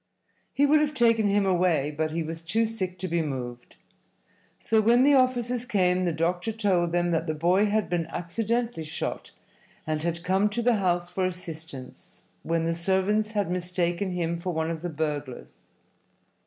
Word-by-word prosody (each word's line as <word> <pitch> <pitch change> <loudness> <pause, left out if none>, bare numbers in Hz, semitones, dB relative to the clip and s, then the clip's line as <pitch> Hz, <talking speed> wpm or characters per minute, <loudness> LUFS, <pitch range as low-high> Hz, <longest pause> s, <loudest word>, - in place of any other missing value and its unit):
He 285 - +3
would 300 +2 +5
have 300 0 0
taken 230 -4 +3
him 200 0 +2
away, 175 -6 +2
but 155 +1 -1
he 165 +1 -2
was 165 +1 -5
too 215 +8 +1
sick 190 -5 -3
to 185 +1 -4
be 170 -1 0
moved. 125 -5 -6 0.8
So 220 -1 +2
when 235 +4 +4
the 285 +1 +5
officers 250 -2 +2
came 185 -6 +1
the 175 - +1
doctor 175 +6 -1
told 190 -6 +1
them 175 0 +1
that 165 0 0
the 155 - -1
boy 180 +6 +3
had 215 +1 0
been 170 -2 -1
accidentally 225 +4 -2
shot 155 - -5 0.6
and 155 -1 -2
had 170 +1 -2
come 190 +3 +2
to 235 +3 -2
the 240 -1 +3
house 175 -3 0
for 185 +1 -1
assistance, 160 -7 -7 0.2
when 165 0 -1
the 165 0 0
servants 195 +5 +1
had 205 -4 0
mistaken 180 +1 -1
him 170 -1 -2
for 180 +1 -3
one 160 0 -1
of 160 -1 -5
the 175 - -3
burglars. 150 -4 -4
180 Hz, 180 wpm, -26 LUFS, 165-215 Hz, 0.8 s, would